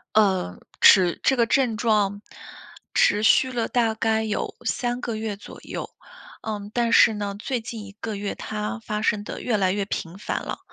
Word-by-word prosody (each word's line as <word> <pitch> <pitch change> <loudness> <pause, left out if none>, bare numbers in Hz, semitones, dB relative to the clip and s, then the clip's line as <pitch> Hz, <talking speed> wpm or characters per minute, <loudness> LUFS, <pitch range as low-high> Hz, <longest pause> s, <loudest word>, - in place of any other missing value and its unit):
呃， 190 - +2 0.2
持 180 -3 +6
这 265 - +2
个 235 - +4
症 235 -3 +1
状， 205 -3 +1 0.7
持 205 +1 +3
续 255 +3 +4
了 235 -2 -1
大 230 -3 +1
概 220 0 0
有 215 -1 -3
3 245 -1 -1
个 230 -2 -3
月 215 -1 -3
左 - - -12
右。 - - -6 0.5
嗯， 210 -1 -5
但 235 -1 +1
是 225 - +7
呢， 205 -1 -4
最 245 +2 -3
近 220 -1 -7
1 200 - -11
个 220 -2 -4
月 200 0 -3
它 210 +2 -4
发 210 -1 -4
生 210 -1 +1
得 - - -7
越 235 -4 0
来 190 -2 +2
越 200 0 -1
频 175 -2 -5
繁 205 - -3
了。 - - -5
215 Hz, 190 characters per minute, -24 LUFS, 205-230 Hz, 0.7 s, 是